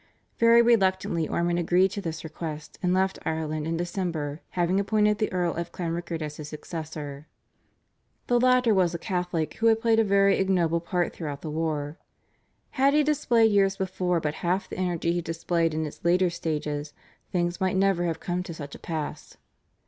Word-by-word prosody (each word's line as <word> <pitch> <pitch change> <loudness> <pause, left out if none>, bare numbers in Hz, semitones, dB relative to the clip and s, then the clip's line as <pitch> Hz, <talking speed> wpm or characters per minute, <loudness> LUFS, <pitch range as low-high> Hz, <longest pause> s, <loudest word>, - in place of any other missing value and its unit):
Very 230 0 +6
reluctantly 190 -7 +2
Ormond 175 0 0
agreed 180 +2 +3
to 200 - -4
this 160 -3 -5
request 155 -1 -7
and 180 - +1
left 190 +1 +1
Ireland 155 -1 -2
in 165 0 -1
December, 170 -4 -3 0.2
having 175 +2 +2
appointed 210 +1 +2
the 215 - 0
Earl 175 -2 0
of 170 0 -4
Clanrickard 170 -1 -3
as 150 0 -6
his 150 -1 -7
successor. 155 -2 -7 1.0
The 245 0 +2
latter 250 -2 +4
was 180 -3 +2
a - - -1
Catholic 175 -2 -2
who 230 - +2
had 225 0 +4
played 225 -1 +3
a - - +5
very 200 -1 +3
ignoble 175 -4 +2
part 175 +1 -1
throughout 145 -4 -5
the 155 - -5
war. 155 -1 -2 0.7
Had 275 +1 +3
he 300 - +5
displayed 245 -7 +3
years 195 -1 +3
before 180 -2 0
but 150 -2 -2
half 180 +3 0
the - - -7
energy 175 -2 0
he 175 0 0
displayed 165 0 0
in 155 0 -2
its 150 - -9
later 175 +1 +3
stages 150 -3 -3 0.4
things 175 0 -1
might 190 0 +1
never 190 -2 +2
have 165 -2 -2
come 180 0 -2
to 175 -2 -7
such 145 -3 -8
a - - -9
pass. 160 -3 -5
175 Hz, 180 wpm, -26 LUFS, 160-195 Hz, 1.0 s, Very